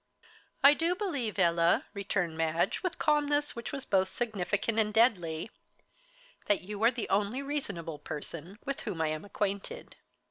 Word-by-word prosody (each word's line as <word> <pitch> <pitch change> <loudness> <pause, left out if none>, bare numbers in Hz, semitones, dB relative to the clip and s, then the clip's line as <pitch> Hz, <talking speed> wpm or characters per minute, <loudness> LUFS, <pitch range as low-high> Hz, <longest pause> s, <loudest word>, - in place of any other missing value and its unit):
"I 280 +1 +10
do 335 +4 0
believe, 285 - -2
Ella," 170 -2 +3
returned 195 -5 -1
Madge, 165 +1 0
with 365 -2 -2
calmness 295 -1 +2
which 235 - -5
was 275 -1 -5
both 190 -1 +3
significant 215 0 -1
and 210 -1 +2
deadly, 200 -6 +2 1.0
"that 205 - +3
you 205 +3 -5
are 230 - +7
the 240 -3 -4
only 210 +7 +1
reasonable 200 - -3
person 165 +6 -6
with 275 -1 -2
whom 170 - -4
I 160 -1 +1
am 155 0 -3
acquainted." 205 - -4
205 Hz, 150 wpm, -30 LUFS, 175-270 Hz, 1.0 s, I